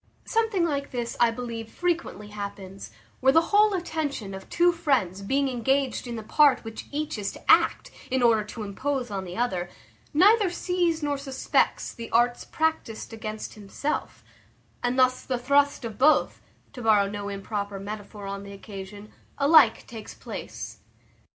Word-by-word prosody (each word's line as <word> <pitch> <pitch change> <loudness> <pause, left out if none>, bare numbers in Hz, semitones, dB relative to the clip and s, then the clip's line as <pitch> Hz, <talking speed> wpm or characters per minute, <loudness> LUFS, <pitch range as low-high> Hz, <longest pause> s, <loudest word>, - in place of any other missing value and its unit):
Something 445 -6 +1
like 285 -3 -2
this, 240 -2 -3
I 240 - +5
believe, 230 -1 -6
frequently 335 - -2
happens, 200 -2 -7 0.3
where 265 +1 +5
the 325 +3 +3
whole 415 0 +5
attention 295 - -3
of 190 0 -9
two 350 +1 +4
friends 270 - 0
being 275 +7 +1
engaged 265 +1 0
in 240 - -4
the 220 - -6
part 275 +3 +4
which 225 -1 -8
each 295 -5 -3
is 200 -1 -2
to - - +1
act, - - +3 0.2
in 260 -1 +1
order 225 -3 +4
to 215 +1 -7
impose 250 +4 -3
on 195 -1 -3
the 180 +2 -7
other, 185 -8 -1 0.4
neither 400 +5 +5
sees 350 -2 0
nor 290 -1 -1
suspects 270 -1 0
the 230 -1 -8
arts 240 +1 +2
practised 315 -9 -2
against 215 -1 -6
himself; 215 +8 -4 0.6
and 245 +1 0
thus 255 0 +3
the 255 - -1
thrust 280 +1 +2
of 220 -3 -7
both 300 +4 +3 0.3
(to 250 - -8
borrow 215 -3 +4
no 205 0 -5
improper 200 0 -4
metaphor 205 0 -7
on 195 0 -5
the 200 0 -9
occasion) 200 +1 -9 0.3
alike 280 -4 +5
takes 225 -3 -9
place. - - -7
240 Hz, 160 wpm, -26 LUFS, 205-285 Hz, 0.6 s, I